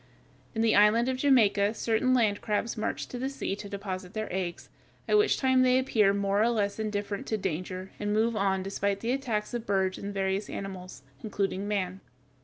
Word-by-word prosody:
In 225 - +1
the 225 - +4
island 210 +4 +5
of 260 - -1
Jamaica 220 -6 +3
certain 230 +4 +1
land 220 -5 +2
crabs 220 +1 -1
march 215 - -3
to 245 - -6
the 265 +2 -1
sea 275 -7 -3
to 205 -1 -8
deposit 190 -2 -5
their 215 -4 -4
eggs, 180 -2 -3 0.4
at - - +3
which 420 0 +4
time 260 -1 +3
they 255 0 +4
appear 220 -6 +3
more 200 0 +1
or 230 - +4
less 210 -3 -1
indifferent 205 -1 -3
to 220 - 0
danger, 185 0 -4
and 205 0 -2
move 220 +2 +2
on, 195 -2 +1
despite 200 +1 -2
the 230 - -1
attacks 245 -6 -2
of 235 -1 -4
birds 190 -2 0
and 200 - -5
various 195 +1 -1
animals, 185 -5 -7 0.2
including 200 -2 -2
man. 190 -2 -2
205 Hz, 195 wpm, -28 LUFS, 195-230 Hz, 0.4 s, island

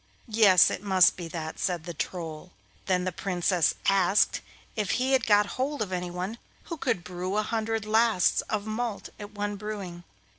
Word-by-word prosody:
'Yes, 210 -5 +6
it - - -4
must 190 -3 +4
be 175 -2 -6
that,' 160 -1 -6
said 175 -3 -1
the 175 +1 -6
Troll. 165 +1 -6 0.3
Then 180 -2 +1
the 185 - -1
Princess 180 -1 0
asked 195 0 +3 0.3
if 210 -4 -2
he 255 +2 0
had 265 -1 +2
got 210 -1 +5 0.2
hold 285 -2 -1
of 195 - -8
anyone 180 +4 -4 0.2
who 335 - -6
could 240 - -1
brew 185 +3 -4
a 215 - +2
hundred 225 0 -2
lasts 220 -3 +3
of 210 -1 -2
malt 220 -1 -4
at 205 0 -9
one 205 0 -3
brewing. 195 -4 -6
200 Hz, 175 wpm, -27 LUFS, 180-215 Hz, 0.3 s, Yes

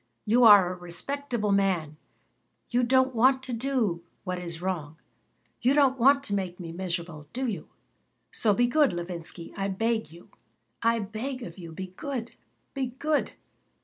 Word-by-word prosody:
You 235 +4 +4
are 200 -4 +8
a - - -9
respectable 215 +5 -3
man. 185 -6 +1 0.7
You 245 +1 +2
don't 260 +1 +3
want 260 +3 +4
to 255 -1 -4
do 230 -8 0 0.2
what 180 -2 -3
is 170 -2 -6
wrong. 165 -4 -3 0.6
You 260 +3 +3
don't 270 -3 +4
want 275 +3 +5
to 205 - -4
make 185 -2 -2
me 170 -2 -6
miserable, 170 -4 -4
do 260 +2 -2
you? 200 -10 -4 0.6
So 220 - +2
be 245 - +4
good, 285 +1 +3
Levinsky. 170 -1 -6
I 195 -1 -1
beg 225 +3 0
of - - -21
you. 170 +2 -15 0.5
I 230 0 +3
beg 230 +5 -4
of 175 -1 -9
you. 170 -2 -8
Be 185 +2 -7
good. 250 -3 -4 0.4
Be 270 -2 -1
good. 300 +1 0
210 Hz, 165 wpm, -27 LUFS, 175-255 Hz, 0.7 s, are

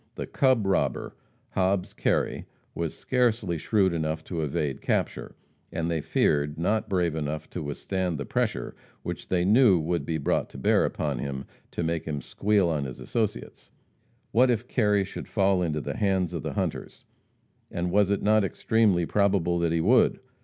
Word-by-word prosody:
The - - -4
"cub" 130 -6 +2
robber, 95 - 0 0.4
Hobbs 95 0 0
Kerry, - - 0 0.3
was 85 -2 -3
scarcely 115 -9 0
shrewd 95 +1 +2
enough 80 -1 -2
to 85 -1 -4
evade 75 -2 -2
capture, - - -2 0.4
and, 85 0 -2
they 80 -2 0
feared, 75 -1 +1
not 105 +7 0
brave 90 -4 +1
enough 75 0 -3
to 90 - -4
withstand 90 +4 -2
the 70 - -4
pressure - - -2 0.3
which - - -5
they 90 -1 +1
knew 105 -1 +6
would 85 +2 -1
be 80 - -2
brought 70 - 0
to - - -11
bear 65 - +3
upon 75 -5 -2
him 70 0 -4 0.2
to - - -3
"make 80 0 -1
him 75 -2 -3
squeal 100 +4 +1
on 75 -4 -1
his 65 - -7
associates." 110 - -3 0.6
What 125 +3 +4
if 120 0 0
Kerry 105 -5 +2
should 95 - -7
fall 95 -3 +2
into 75 -3 -1
the - - -5
hands 95 -4 +1
of 85 - -3
the - - -4
hunters? - - -4 0.6
And 85 +1 -2
was 100 0 +3
it 100 - 0
not 110 0 +4
extremely 100 -2 +2
probable 95 -3 +2
that 85 -1 +1
he 85 0 +1
would? 115 +10 +4
90 Hz, 175 wpm, -27 LUFS, 80-100 Hz, 0.6 s, knew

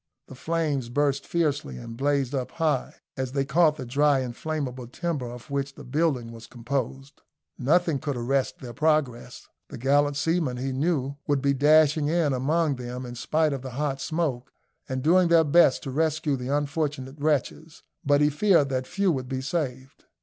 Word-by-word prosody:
The - - -9
flames 145 -3 -2
burst 140 +2 0
fiercely, 145 - -1
and 115 - -8
blazed 140 0 0
up 130 -3 -3
high, 160 -2 -1 0.2
as 130 -1 -4
they 140 -1 0
caught 155 +2 +3
the 130 - -7
dry 140 +2 +2
inflammable 130 -1 -4
timber 150 -1 -3
of 120 +3 -11
which 140 0 -2
the 145 - -11
building 135 -3 0
was 115 0 -11
composed. 135 +3 -4 0.4
Nothing 160 +2 +2
could 145 -3 -3
arrest 130 +3 0
their 120 -2 -8
progress. 135 -4 -1 0.2
The - - -8
gallant 140 +3 +2
seamen, 160 -5 0
he 135 +2 -3
knew, 140 -1 -1
would 145 -2 +2
be 140 +1 +2
dashing 150 +1 +4
in 160 -3 +1
among 145 +3 +1
them 125 +1 -6
in 120 - -7
spite 155 +5 0
of 135 - -4
the 130 - -6
hot 140 -2 -1
smoke, 150 -7 -2 0.4
and 130 0 -3
doing 175 +3 +5
their 170 -1 +5
best 155 -2 +4
to 135 - -5
rescue 155 0 0
the 125 -1 -5
unfortunate 145 -1 -2
wretches, 150 +1 -2 0.2
but 145 0 +3
he 150 0 +4
feared 155 -3 +3
that 130 -1 -2
few 195 0 +1
would 130 -4 -3
be 130 -1 -2
saved. 130 -3 -4
140 Hz, 180 wpm, -26 LUFS, 130-155 Hz, 0.4 s, doing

